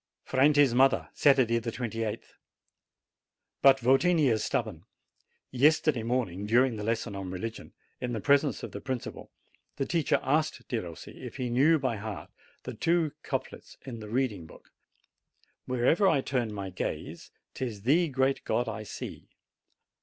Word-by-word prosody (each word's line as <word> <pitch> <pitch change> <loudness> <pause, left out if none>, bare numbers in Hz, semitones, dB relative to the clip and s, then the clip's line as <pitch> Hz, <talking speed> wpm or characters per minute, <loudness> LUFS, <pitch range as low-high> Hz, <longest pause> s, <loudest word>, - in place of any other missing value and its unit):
FRANTI'S 145 -1 +4
MOTHER 130 +2 +3
Saturday, 130 -5 +4
28th. 115 -1 -4 1.3
But 135 -1 +7
Votini 140 +5 +3
is 110 - 0
stubborn. - - -2 0.7
Yesterday 145 0 +3
morning, 110 -5 -2
dur 120 +4 +5
ing 120 -4 -3
the 105 - -5
lesson 115 -1 -2
on 95 -1 -5
religion, 110 +5 -6 0.3
in 125 - -3
the 115 - -2
presence 140 +5 +2
of - - -6
the - - -7
principal, 130 -3 -5 0.5
the 135 - -2
teacher 165 -2 +1
asked 155 +4 0
Derossi 90 -9 -6
if - - -7
he 125 -2 -3
knew 145 +7 +4
by 130 -6 -1
heart 105 0 -7 0.3
the - - -6
two 165 -2 +1
couplets - - -5
in 120 -4 -7
the 105 -1 -9
reading 110 -8 -1
book, - - -17 1.0
'Where'er 130 +10 +3
I 140 - +3
turn 125 -5 -1
my 100 -2 -5
gaze, 90 - -5 0.2
Tis 110 -6 -5
Thee, 160 +8 +3
great 135 -1 0
God, 120 +2 0
I 110 -1 -4
see." 105 - -8
125 Hz, 145 wpm, -29 LUFS, 110-135 Hz, 1.3 s, But